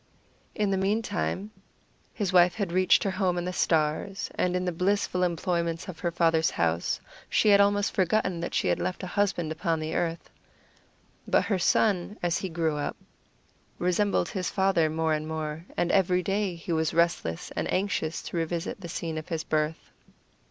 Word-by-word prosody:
In 210 Hz, -2 st, +1 dB
the 190 Hz, -, +1 dB
meantime 200 Hz, -, -1 dB, 0.6 s
his 195 Hz, -4 st, -2 dB
wife 175 Hz, -1 st, +5 dB
had 200 Hz, -5 st, -2 dB
reached 185 Hz, +1 st, +4 dB
her 195 Hz, -, 0 dB
home 185 Hz, -2 st, 0 dB
in 175 Hz, -, -2 dB
the 180 Hz, -, -3 dB
stars, 160 Hz, +4 st, 0 dB
and 180 Hz, 0 st, 0 dB
in 180 Hz, 0 st, 0 dB
the 180 Hz, -, 0 dB
blissful 180 Hz, +1 st, 0 dB
employments 170 Hz, -1 st, -1 dB
of 180 Hz, -4 st, -8 dB
her 175 Hz, -, 0 dB
father's 165 Hz, -1 st, +2 dB
house 85 Hz, 0 st, 0 dB, 0.3 s
she 210 Hz, -, +4 dB
almost 200 Hz, +1 st, +3 dB
forgot 200 Hz, +3 st, +2 dB
that 175 Hz, -2 st, -3 dB
she -, -, +1 dB
had 90 Hz, -, +1 dB
left 185 Hz, -, -3 dB
a 180 Hz, -, -6 dB
husband 190 Hz, -6 st, 0 dB
upon 165 Hz, 0 st, -1 dB
the 155 Hz, 0 st, -3 dB
earth. 170 Hz, -1 st, -2 dB, 1.0 s
But -, -, +3 dB
her 195 Hz, -4 st, 0 dB
son, 200 Hz, +2 st, +2 dB
as 175 Hz, -1 st, +1 dB
he 190 Hz, -, -4 dB
grew 160 Hz, -2 st, -1 dB
up, 145 Hz, -, -3 dB, 0.8 s
resembled 180 Hz, +1 st, +1 dB
his 185 Hz, -2 st, -2 dB
father 190 Hz, -5 st, +2 dB
more 160 Hz, 0 st, 0 dB
and 155 Hz, 0 st, -2 dB
more, 160 Hz, 0 st, -4 dB
and 175 Hz, -, +1 dB
every 180 Hz, -1 st, +3 dB
day 195 Hz, 0 st, -1 dB
he 170 Hz, +1 st, -7 dB
was 160 Hz, -1 st, 0 dB
restless 170 Hz, -, 0 dB
and -, -, -2 dB
anxious 185 Hz, -4 st, -1 dB
to -, -, -5 dB
revisit 165 Hz, +3 st, -3 dB
the 170 Hz, -, -7 dB
scene 160 Hz, -1 st, -3 dB
of 155 Hz, -, -11 dB
his 165 Hz, -2 st, -2 dB
birth. 155 Hz, +1 st, -2 dB
175 Hz, 180 wpm, -27 LUFS, 160-190 Hz, 1.0 s, wife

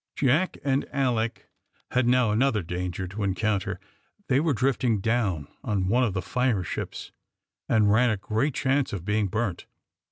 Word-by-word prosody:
Jack 145 Hz, +7 st, +2 dB
and 135 Hz, 0 st, 0 dB
Alick 120 Hz, -6 st, -1 dB, 0.4 s
had 125 Hz, -1 st, +2 dB
now 125 Hz, -3 st, +3 dB
another 110 Hz, -2 st, +2 dB
danger 90 Hz, +2 st, -4 dB
to 100 Hz, +4 st, -6 dB
encounter. 100 Hz, 0 st, -1 dB, 0.5 s
They 135 Hz, 0 st, +4 dB
were 155 Hz, -2 st, +1 dB
drifting 125 Hz, -3 st, +1 dB
down 100 Hz, -9 st, 0 dB, 0.2 s
on 95 Hz, -3 st, 0 dB
one 125 Hz, +4 st, +3 dB
of 105 Hz, -6 st, 0 dB
the 95 Hz, -, -1 dB
fire 125 Hz, -2 st, 0 dB
ships, -, -, -5 dB, 0.6 s
and 105 Hz, -2 st, +4 dB
ran 120 Hz, +3 st, +4 dB
a 110 Hz, -, 0 dB
great 110 Hz, +8 st, -1 dB
chance 135 Hz, -2 st, +1 dB
of 90 Hz, -4 st, -5 dB
being 105 Hz, 0 st, +1 dB
burnt. 105 Hz, -2 st, -2 dB
110 Hz, 160 wpm, -26 LUFS, 100-130 Hz, 0.6 s, They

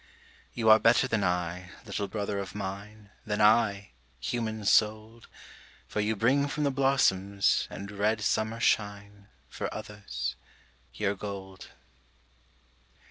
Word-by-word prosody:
You 115 Hz, -2 st, -1 dB
are 110 Hz, -, +8 dB
better 115 Hz, +4 st, +4 dB
than 115 Hz, -5 st, 0 dB
I, 90 Hz, 0 st, -2 dB, 0.2 s
little 100 Hz, -, -3 dB
brother 100 Hz, -1 st, -3 dB
of 100 Hz, 0 st, -6 dB
mine, 100 Hz, +1 st, -7 dB
Than 105 Hz, -1 st, -2 dB
I, 105 Hz, -, +3 dB, 0.3 s
human 110 Hz, -, -3 dB
souled, 110 Hz, +2 st, +1 dB, 0.6 s
For -, -, -4 dB
you 105 Hz, +1 st, +1 dB
bring 135 Hz, +7 st, +2 dB
from 150 Hz, +1 st, -2 dB
the 140 Hz, -, +2 dB
blossoms 100 Hz, -8 st, +2 dB
and 100 Hz, +1 st, -8 dB
red 105 Hz, +2 st, 0 dB
summer 110 Hz, +2 st, 0 dB
shine, 100 Hz, -2 st, -1 dB, 0.2 s
For -, -, -5 dB
others, 105 Hz, -11 st, -5 dB, 0.6 s
your 100 Hz, -1 st, 0 dB
gold. 95 Hz, -1 st, -8 dB
105 Hz, 125 wpm, -29 LUFS, 100-110 Hz, 0.6 s, are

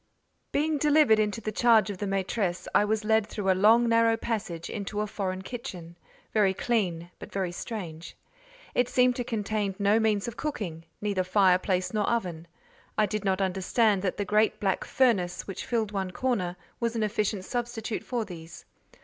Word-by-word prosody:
Being 300 Hz, +1 st, +1 dB
delivered 295 Hz, -6 st, +5 dB
into 210 Hz, +1 st, 0 dB
the 215 Hz, -, -3 dB
charge 220 Hz, -1 st, +4 dB
of 190 Hz, -, -8 dB
the 205 Hz, -, -2 dB
maîtresse, 195 Hz, -1 st, -1 dB
I -, -, +5 dB
was 215 Hz, +1 st, -1 dB
led 220 Hz, -1 st, +3 dB
through 200 Hz, -3 st, 0 dB
a -, -, +5 dB
long 230 Hz, +3 st, +6 dB
narrow 230 Hz, 0 st, +4 dB
passage 210 Hz, -8 st, -3 dB
into 205 Hz, 0 st, -4 dB
a -, -, 0 dB
foreign 190 Hz, -2 st, -4 dB
kitchen, 180 Hz, -8 st, -7 dB, 0.4 s
very 200 Hz, -3 st, +3 dB
clean 180 Hz, -8 st, -1 dB
but -, -, -10 dB
very 190 Hz, -3 st, -2 dB
strange. 175 Hz, -5 st, -7 dB, 0.6 s
It 245 Hz, 0 st, +2 dB
seemed 250 Hz, 0 st, +3 dB
to 245 Hz, -, -1 dB
contain 210 Hz, -3 st, -2 dB
no 205 Hz, +2 st, +3 dB
means 215 Hz, -2 st, +1 dB
of 235 Hz, -, -6 dB
cooking—neither 190 Hz, -, -3 dB
fireplace 185 Hz, -1 st, +2 dB
nor 210 Hz, -1 st, +1 dB
oven; 175 Hz, -8 st, -2 dB, 0.5 s
I 215 Hz, -, +4 dB
did 210 Hz, +1 st, -3 dB
not 190 Hz, -1 st, +1 dB
understand 195 Hz, +2 st, +2 dB
that 185 Hz, -2 st, -2 dB
the 205 Hz, -, -1 dB
great 210 Hz, +2 st, +2 dB
black 195 Hz, -2 st, 0 dB
furnace 190 Hz, -9 st, +1 dB
which 195 Hz, -2 st, -6 dB
filled 225 Hz, -3 st, 0 dB
one 195 Hz, -2 st, -2 dB
corner, 185 Hz, -5 st, -1 dB, 0.2 s
was 235 Hz, -1 st, -1 dB
an 225 Hz, -, 0 dB
efficient 210 Hz, -2 st, -1 dB
substitute 240 Hz, -2 st, -3 dB
for 240 Hz, -3 st, -2 dB
these. 170 Hz, -3 st, -10 dB
210 Hz, 175 wpm, -28 LUFS, 185-225 Hz, 0.6 s, long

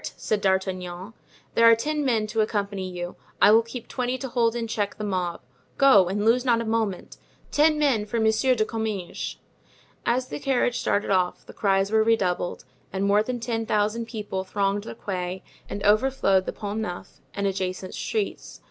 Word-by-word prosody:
said 210 Hz, -1 st, -1 dB
D'Artagnan. 190 Hz, 0 st, -1 dB, 0.4 s
"There 230 Hz, 0 st, +6 dB
are 230 Hz, -, +7 dB
ten 300 Hz, +6 st, -1 dB
men 230 Hz, -5 st, +1 dB
to 220 Hz, +1 st, 0 dB
accompany 200 Hz, -3 st, -2 dB
you. 175 Hz, -1 st, -6 dB, 0.2 s
I 205 Hz, -, +7 dB
will 225 Hz, +1 st, +7 dB
keep 230 Hz, +1 st, -8 dB
twenty 250 Hz, 0 st, -2 dB
to 265 Hz, 0 st, -5 dB
hold 235 Hz, -1 st, +1 dB
in 235 Hz, -1 st, -2 dB
check 215 Hz, -3 st, -2 dB
the 215 Hz, -, -5 dB
mob; 180 Hz, -4 st, -2 dB, 0.4 s
go, 210 Hz, -10 st, +6 dB
and 205 Hz, +3 st, -1 dB
lose 240 Hz, +2 st, +4 dB
not 240 Hz, -3 st, +3 dB
a 230 Hz, -, -3 dB
moment. 220 Hz, -4 st, -2 dB, 0.3 s
Ten 305 Hz, +1 st, +4 dB
men 260 Hz, -8 st, +2 dB
for 230 Hz, +2 st, -1 dB
Monsieur 220 Hz, +4 st, +3 dB
de 215 Hz, -2 st, +1 dB
Comminges." 215 Hz, -5 st, -4 dB, 0.7 s
As 250 Hz, +2 st, 0 dB
the 145 Hz, -, -5 dB
carriage 245 Hz, -2 st, +1 dB
started 205 Hz, 0 st, 0 dB
off 185 Hz, -2 st, +1 dB
the -, -, -12 dB
cries 195 Hz, 0 st, +1 dB
were 220 Hz, 0 st, +4 dB
redoubled 190 Hz, -6 st, 0 dB, 0.3 s
and 195 Hz, +1 st, -1 dB
more 205 Hz, +1 st, +4 dB
than 245 Hz, +3 st, -3 dB
ten 225 Hz, -1 st, -2 dB
thousand 215 Hz, +2 st, 0 dB
people 210 Hz, -5 st, -4 dB
thronged 200 Hz, +1 st, -1 dB
the -, -, -7 dB
Quai 185 Hz, -3 st, -4 dB, 0.3 s
and 200 Hz, -, -5 dB
overflowed 210 Hz, -3 st, +3 dB
the -, -, -1 dB
Pont 210 Hz, 0 st, -4 dB
Neuf 180 Hz, -5 st, -6 dB, 0.2 s
and 200 Hz, -, -1 dB
adjacent 185 Hz, -1 st, -2 dB
streets. 430 Hz, -2 st, -3 dB
215 Hz, 185 wpm, -25 LUFS, 195-230 Hz, 0.7 s, are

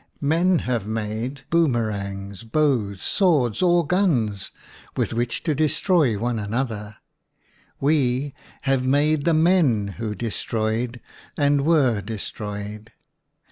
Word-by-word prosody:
Men 170 Hz, +5 st, +2 dB
have 120 Hz, -5 st, -1 dB
made 110 Hz, +5 st, -3 dB
boom 165 Hz, -5 st, +3 dB
erangs, 100 Hz, -2 st, -4 dB
bows, 115 Hz, -7 st, 0 dB
swords, 145 Hz, -, +2 dB
or 175 Hz, -2 st, +4 dB
guns 135 Hz, -, 0 dB, 0.5 s
with -, -, 0 dB
which 120 Hz, 0 st, -2 dB
to 160 Hz, -, +1 dB
destroy 155 Hz, -, +2 dB
one 120 Hz, +2 st, -1 dB
another; 105 Hz, -1 st, -3 dB, 0.8 s
we 140 Hz, -2 st, +1 dB, 0.3 s
have 135 Hz, -2 st, +1 dB
made 145 Hz, +3 st, +2 dB
the 170 Hz, -2 st, +3 dB
men 155 Hz, -, +3 dB
who 110 Hz, -2 st, -3 dB
destroyed 115 Hz, +2 st, -2 dB, 0.4 s
and 145 Hz, 0 st, +2 dB
were 135 Hz, -10 st, +3 dB
destroyed! 105 Hz, 0 st, -6 dB
125 Hz, 110 wpm, -23 LUFS, 110-150 Hz, 0.8 s, or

